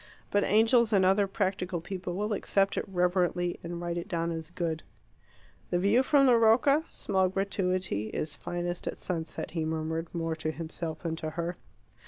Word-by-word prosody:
But 205 0 +3
angels 225 +2 +4
and 195 -3 +4
other 195 +2 +4
practical 185 -2 -1
people 180 0 -5
will 210 +3 -1
accept 195 0 +1
it - - -1
reverently, 180 -1 +1
and 170 0 -5
write 175 0 -2
it 170 - -7
down 170 -3 -1
as 160 -1 -5
good. 170 -3 -2 0.9
"The 175 - +1
view 200 +7 +4
from 275 +1 +4
the 245 -3 +6
Rocca 255 +7 +4
(small 190 -2 0
gratuity) 185 - -1
is 150 +4 -4
finest 175 +2 -4
at - - -3
sunset," 165 -3 -4
he 165 -2 -2
murmured, 160 +1 -2
more 165 -1 -2
to 155 0 -2
himself 160 0 -5
than 165 -2 -1
to 155 - -3
her. 170 +2 -3
180 Hz, 175 wpm, -29 LUFS, 165-195 Hz, 0.9 s, the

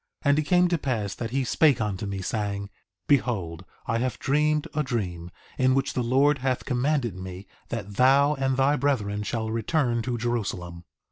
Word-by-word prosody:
3:2 - - +4
And 145 - +3
it - - +1
came 180 +2 +4
to 175 -1 +1
pass 110 -9 -2
that 115 - -5
he 135 +2 0
spake 140 +1 +3
unto 105 -2 -2
me, 100 -1 -4
saying: 100 -1 -3 0.4
Behold 95 - 0 0.2
I 115 - 0
have 125 -1 -1
dreamed 150 +2 +1
a 150 - 0
dream, 90 - -3 0.3
in 130 0 +4
the 130 - +3
which 135 0 0
the 125 - 0
Lord 135 +4 +3
hath 130 0 -1
commanded 125 - 0
me 95 +1 -8 0.2
that 105 -4 -5
thou 140 +3 +5
and 135 -2 -1
thy 140 +2 +3
brethren 110 -7 0
shall 110 +1 -3
return 120 +1 0
to 120 +1 -2
Jerusalem. 95 -8 -3
120 Hz, 190 wpm, -26 LUFS, 105-140 Hz, 0.4 s, thou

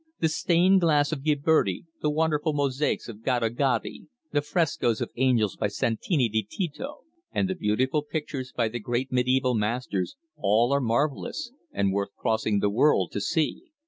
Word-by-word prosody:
The 160 - +2
stained 175 +4 +3
glass 150 -3 +3
of 150 -4 -3
Ghiberti, 150 - +2 0.2
the 150 - +1
wonderful 155 0 +1
mosaics 145 0 0
of 110 -2 -9
Gaddo 120 -2 +1
Gaddi, 120 0 -1 0.2
the 145 - +2
frescoes 145 - 0
of - - -3
angels 120 -5 +2
by - - 0
Santi 120 - 0
di 110 0 0
Tito, 180 - -5 0.3
and 195 - 0
the 190 - -1
beautiful 130 - 0
pictures 145 -4 -5
by 115 -2 0
the 120 +2 -4
great 120 +4 -2
mediæval 125 0 +2
masters, 105 - -1 0.2
all 115 +6 +3
are 140 - +2
marvellous, 145 - -1 0.2
and 100 -1 0
worth 100 0 -2
crossing 110 -2 0
the 100 - +2
world 105 - +3
to 100 - -3
see. 160 - 0
130 Hz, 165 wpm, -26 LUFS, 115-155 Hz, 0.3 s, stained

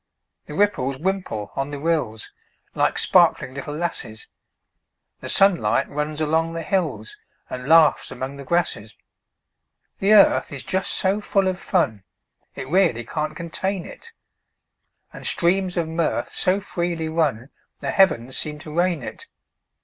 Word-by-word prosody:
The 150 - -7
ripples 145 -9 +1
wimple 170 - -3
on 135 +1 -2
the 145 - -5
rills, 145 -8 -2 0.4
Like - - +1
sparkling 130 - +3
little 140 +2 -6
lasses; 135 -9 -4 0.9
The - - -7
sunlight 180 - +3
runs 150 +1 -3
along 160 +2 0
the 165 0 -4
hills, 150 - -2 0.3
And 125 +2 -6
laughs 160 -1 +5
among 130 +2 -6
the 140 - -8
grasses. 135 -9 -1 1.0
The 200 +2 +4
earth 205 -2 +5
is 140 -2 -5
just 190 0 -1
so 195 +2 +1
full 195 -2 +1
of 185 0 -1
fun 110 - 0 0.5
It 135 - -6
really 165 -8 +2
can't 155 +5 -4
contain 180 +2 -3
it; 465 - -11 1.0
And - - -3
streams 185 +1 +1
of 170 -2 0
mirth 165 0 -1
so 185 +2 +1
freely 170 -4 -3
run 150 -6 -1 0.3
The - - -3
heavens 130 - +2
seem 150 -1 -2
to 150 0 -10
rain 175 -4 +1
it. - - -8
160 Hz, 140 wpm, -22 LUFS, 135-185 Hz, 1.0 s, laughs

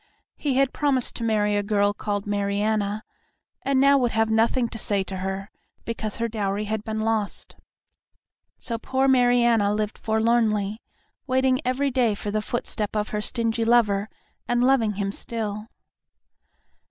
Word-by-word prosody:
He 280 -4 -1
had 270 -1 +2
promised 275 -4 0
to 235 - -5
marry 210 -2 +1
a 205 - +2
girl 205 0 +1
called 205 -1 -3
Mariana, 205 +1 -1 0.6
and 275 -1 +1
now 275 +1 +5
would 245 -2 0
have 220 0 +2
nothing 230 +3 +2
to 225 - -7
say 200 -2 0
to 190 0 -6
her, 190 +2 -4 0.3
because 220 -2 -4
her 230 0 -1
dowry 205 -2 -2
had 215 0 -3
been 220 0 -3
lost. 220 -2 -2 1.0
So 230 -2 -4
poor 265 +3 0
Mariana 240 -5 +4
lived 210 0 -3
forlornly, 220 -1 +1 0.5
waiting 260 0 +2
every 265 +2 0
day 240 -4 +2
for 205 0 -4
the 215 +1 0
footstep 215 -2 -3
of 210 0 -1
her 210 - -2
stingy 230 +1 0
lover, 220 -3 +3 0.4
and 240 0 +2
loving 250 -5 +3
him 195 0 -2
still. 215 -1 -4
220 Hz, 155 wpm, -24 LUFS, 205-240 Hz, 1.0 s, now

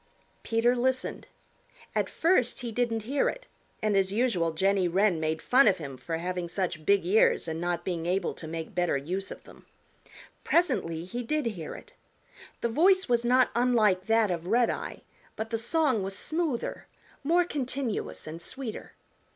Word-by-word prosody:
Peter 235 +2 +2
listened. 255 +1 -1 0.7
At - - 0
first 295 -9 +2
he 240 -2 -4
didn't 225 -1 -1
hear 275 +5 +1
it, - - -7 0.4
and 215 -1 +2
as 195 -1 +2
usual 205 -7 +1
Jenny 190 +3 +2
Wren 185 0 +2
made 160 0 -2
fun 255 0 +5
of 195 -3 +4
him 140 -5 -7
for 165 +5 -4
having 180 +1 -3
such 170 -4 -3
big 200 -3 +4
ears 200 -1 +3
and 160 +1 -3
not 175 0 -2
being 170 -3 -2
able 185 +2 0
to 160 - -9
make 160 0 -6
better 175 -5 +1
use 180 +8 -4
of - - -9
them. - - -17 0.8
Presently 170 - +1
he 240 +7 -4
did 300 +4 -1
hear 180 -9 -4
it. - - -13 0.7
The 235 - 0
voice 375 +9 +4
was 240 -2 +2
not 250 +1 +4
unlike 220 -6 +2
that 225 -3 +3
of 170 0 -3
Redeye, 235 +3 0 0.3
but 220 +1 -5
the 225 - 0
song 265 -1 +1
was 195 0 -4
smoother, 315 -7 -2 0.4
more 345 +4 +3
continuous 265 - -3
and 160 +2 -7
sweeter. 240 +5 -6
215 Hz, 165 wpm, -28 LUFS, 175-250 Hz, 0.8 s, fun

